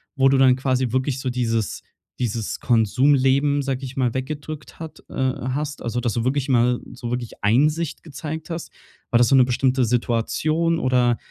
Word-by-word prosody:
wo 135 -1 +4
du 135 - +3
dann 130 -1 +5
quasi 130 -2 0
wirklich 130 +1 -1
so 130 -1 -2
dieses 115 -3 -1 0.4
dieses 115 -3 -2
Konsumleben, 135 +5 +3
sage 135 0 -3
ich 130 0 -8
mal, 125 -3 +1
weggedrückt 150 +3 -6
hat 160 -1 -8
äh, - - -11
hast? 130 +3 -2
Also, 120 +1 -2
dass 120 -3 -1
du 115 +2 -1
wirklich 135 +1 0
mal 125 -1 +3
so 125 -1 -6
wirklich 125 -3 -5
Einsicht 150 +9 +1
gezeigt 160 +2 -7
hast? 165 0 -5 0.4
War 120 - +3
das 120 -1 +4
so - - +5
'ne 130 -2 +6
bestimmte 130 +1 +1
Situation 140 +8 0
oder 125 -4 +2
130 Hz, 175 wpm, -22 LUFS, 120-145 Hz, 0.4 s, ne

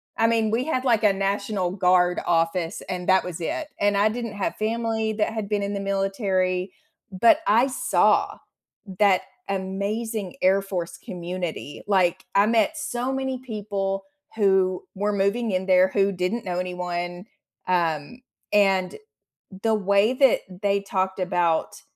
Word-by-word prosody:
I 225 - +3
mean, 225 -2 +1
we 235 +3 +1
had, 260 -5 -1
like, 230 -4 +3
a 210 - +6
national 195 -1 -1
guard 180 -2 +3
office 165 +1 0
and 180 0 -4
that 190 0 +5
was 180 -1 -6
it, 300 - -3
and 205 0 +2
I 210 +2 +4
didn't 230 -1 -4
have 200 - -2
family 220 0 -1
that 215 +1 -1
had 215 -3 -4
been 205 -1 0
in 200 +1 -2
the 200 - -2
military, 195 -2 -1 0.4
but 230 - +4
I 230 +5 +5
saw 265 - +2 0.6
that 200 -3 +4 0.3
amazing 200 +2 -3
Air 190 +1 +4
Force 185 -3 -5
community, 175 -4 -5
like, 190 -2 +2
I 200 +1 +5
met 230 +7 +2
so 250 -3 -2
many 265 -1 -2
people 205 -5 -3 0.3
who 190 -3 +2
were 205 +1 -1
moving 200 +4 0
in 185 -1 -1
there 185 0 +5
who 195 +1 +1
didn't 190 +5 -2
know 180 -1 -2
anyone, 180 0 -4 0.4
um, 170 - -1 0.3
and 195 -3 +3 0.7
the 225 -1 +2
way 200 +3 +2
that 265 -1 +4 0.2
they 200 0 +2
talked 190 -1 -2
about 175 -2 0
195 Hz, 150 wpm, -24 LUFS, 185-220 Hz, 0.7 s, a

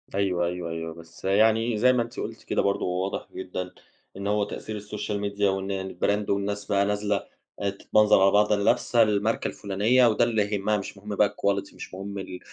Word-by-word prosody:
أيوه، 90 -3 +1
أيوه، 90 -1 -3
أيوه 80 0 -5
بس 85 +2 -13
يعني 110 +3 +3
زي 125 +3 +5
ما 120 -2 +2
أنتِ 115 - -9
قُلتِ - - -6
كده - - 0
برضه 100 0 0
هو 90 +1 -1
واضح 95 - -4
جدًا، 90 -1 -5 0.5
إن 100 +1 -4
هو 105 0 +2
تأثير 105 +1 -5
الSOCIAL 105 0 -4
MEDIA 100 0 -10
وإن 95 -1 -1
الbrand 105 0 0
والناس 100 +1 -1
بقى 100 -1 +2
نازلة 105 0 -1 0.4
تتمنظر 100 +1 +3
على 95 0 +6
بعض 105 +1 +3
اللي 100 -1 +2
لابسة 120 -1 +3
الماركة 105 +1 0
الفلانية، 110 +6 +2
وده 110 - +3
اللي 110 -3 +2
يهمها 105 +2 +1
مش 100 0 -7
مهم 105 +1 -6
بقى 105 0 +4
الquality، 100 0 -1
مش - - -9
مهم 100 +1 -6
ال 90 -1 -6
100 Hz, 195 wpm, -26 LUFS, 95-105 Hz, 0.5 s, على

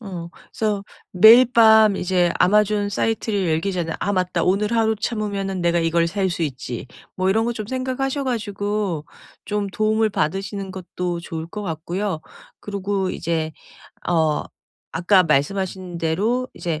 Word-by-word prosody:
어 180 -6 -7 0.2
그래서 210 -2 -1 0.3
매일 220 +7 +8
밤 220 -3 +6
이제 180 -2 +1
아마존 210 +1 +3
사이트를 205 -2 -1
열기 165 +5 0
전에 170 -3 -2
'아 205 - -1
맞다. 180 -3 0
오늘 200 +4 +1
하루 220 -1 +2
참으면은 200 -3 -3
내가 170 0 +2
이걸 165 0 +2
살 190 +2 -1
수 170 -1 -3
있지.' 130 -5 -4 0.3
뭐 185 0 0
이런 220 +3 +2
거 240 - 0
좀 215 -2 -5
생각하셔 260 +3 -2
가지고 205 - -2 0.4
좀 210 -1 -1
도움을 215 +2 +1
받으시는 195 +3 -2
것도 180 -1 -4
좋을 160 -1 -6
것 210 +4 -6
같고요. 170 +1 -3 0.4
그리고 200 -2 -2
이제 160 -1 -2 0.6
어 160 -3 +2 0.5
아까 180 +3 +4
말씀하신 180 +4 -1
대로 210 +11 0
이제 165 -3 -3
195 Hz, 295 characters per minute, -22 LUFS, 170-210 Hz, 0.6 s, 매일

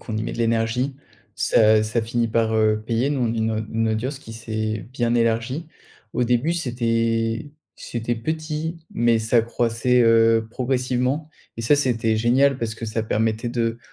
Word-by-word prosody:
qu'on 110 - -5
y 110 - -2
met - - -4
de - - -8
l'énergie, 115 +3 0 0.4
ça 110 0 +4
ça 110 +2 0
finit 115 +1 -1
par 110 0 +1
heu 110 -1 +2
payer, 120 +4 0
nous, 130 -4 0
une 110 -1 -1
une 115 0 +1
audience 125 +6 -2
qui 115 - -10
s'est 110 -1 -4
bien 120 -2 0
élargie. 115 +6 0 0.5
Au 125 - 0
début, 125 +7 +1
c'était 115 -4 -1 0.3
c'était 120 0 -3
petit, 155 +5 -3 0.2
mais 120 -1 +3
ça 115 +1 +2
croissait 120 +2 +1
heu 115 -1 +4
progressivement. 130 +3 -1 0.3
Et 115 - -5
ça, 145 +6 +4
c'était 115 -5 +1
génial, 130 +4 +3
parce 115 -1 -3
que 115 - -6
ça 110 +1 -2
permettait 110 +2 -1
de 115 -1 -1
115 Hz, 165 wpm, -22 LUFS, 110-125 Hz, 0.5 s, ça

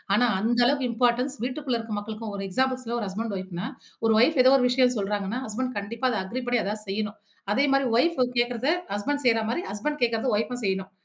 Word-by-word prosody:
ஆனா 245 +3 +4
அந்த 235 +2 +1
அளவுக்கு 270 -2 +1
இம்பார்ட்டன்ஸ் 245 +3 +1
வீட்டுக்குள்ள 255 -2 -2
இருக்க 225 -1 -6
மக்களுக்கும் 215 0 -6
ஒரு 195 - -4
எக்ஸாம்பிள்ஸில 255 +2 0
ஒரு 210 - -3
ஹஸ்பண்ட் 210 +1 -3
ஒய்ஃப்னா, 185 +1 -5 0.4
ஒரு 220 - +4
ஒய்ஃப் 285 +2 +3
ஏதோ 260 - +7
ஒரு 250 - +3
விஷயம் 250 0 +3
சொல்றாங்கனா, 205 +3 -2
ஹஸ்பண்ட் 255 +4 -3
கண்டிப்பா 230 +5 -2
அத 220 - -1
அக்ரி 250 +7 -4
பண்ணி 245 -1 +2
எதா 205 +2 -2
செய்யனும். 210 +1 -3 0.4
அதே 270 - +3
மாரி 275 -1 +3
வைப் 335 +3 +2 0.2
கேட்கிறத 240 +3 0 0.3
ஹஸ்பண்ட் 285 +7 -2
செய்ற 225 -1 +4
மாரி, 295 - -1
ஹஸ்பண்ட் 295 +8 -3
கேட்கிறத 230 +1 +1
வைப்உம் 245 +2 -3
செய்யனும். 190 0 -1
235 Hz, 195 wpm, -26 LUFS, 210-255 Hz, 0.4 s, ஏதோ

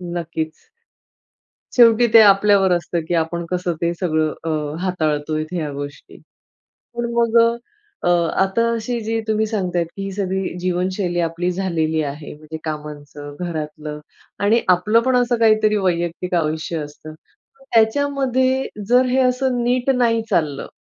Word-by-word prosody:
नक्कीच. 160 -2 -5 1.1
शेवटी 235 -1 +6
ते 230 - +10
आपल्यावर 200 -2 +5
असतं, 175 0 0
की 175 - -2
आपण 170 +1 -4
कसं 180 -1 -1
ते 170 0 +1
सगळं, 155 -4 0
अ, 165 - -3 0.3
हाताळतोय 155 -4 -1
ह्या 160 -5 -3
गोष्टी. 145 +1 -8 0.8
पण 235 0 -2
मग 235 -1 +2 0.7
अ, - - +2 0.3
आता 195 +5 +2
अशी 235 +1 -3
जी 225 +1 -1
तुम्ही 220 0 +1
सांगतायत, 180 -5 -1
की 195 - -6
ही 195 - -4
सगळी 190 -1 -2
जीवनशैली 180 0 -1
आपली 170 +1 -1
झालेली 165 -4 -1
आहे, 145 +2 -8
म्हणजे 155 +1 -9
कामांचं, 150 -2 -7
घरातलं 155 -3 -5 0.4
आणि 225 +3 +3
आपलं 210 +6 +2
पण 260 - +3
असं 245 -1 +1
काहीतरी 215 -1 +4
वैयक्तिक 180 -1 -1
आयुष्य 160 0 -1
असतं. 150 +1 -11 0.6
त्याच्यामध्ये 260 +2 +2 0.2
जर 250 +1 +5
हे 255 +1 +1
असं 255 -1 +1
नीट 245 +2 0
नाही 230 -2 +2
चाललं, 155 -8 0
180 Hz, 135 wpm, -20 LUFS, 160-230 Hz, 1.1 s, ते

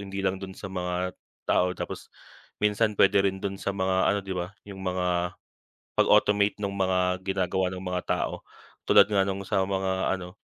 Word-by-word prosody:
hindi 95 -1 -5
lang 95 0 0
dun 95 -1 -8
sa - - -11
mga 90 0 -2 0.3
tao, 90 0 +2
tapos - - -6 0.5
minsan 105 +1 +1
pwede 100 0 +5
rin 95 -1 +1
dun 95 0 -4
sa - - -3
mga 95 -1 0 0.2
ano 100 - 0
'di 95 - -4
ba, 90 +2 -4
yung 100 -2 -10
mga 90 -1 -1 0.6
pag-automate 105 0 +3
nung 100 0 -1
mga 95 -1 +1
ginagawa 95 -1 0
ng 90 0 -7
mga 90 -1 -2
tao, - - -1 0.5
tulad - - +8
nga 100 -2 +2
nung 95 0 -2
sa 95 -1 +1
mga 95 0 0
ano, 90 -1 -9
95 Hz, 175 wpm, -27 LUFS, 90-100 Hz, 0.6 s, tulad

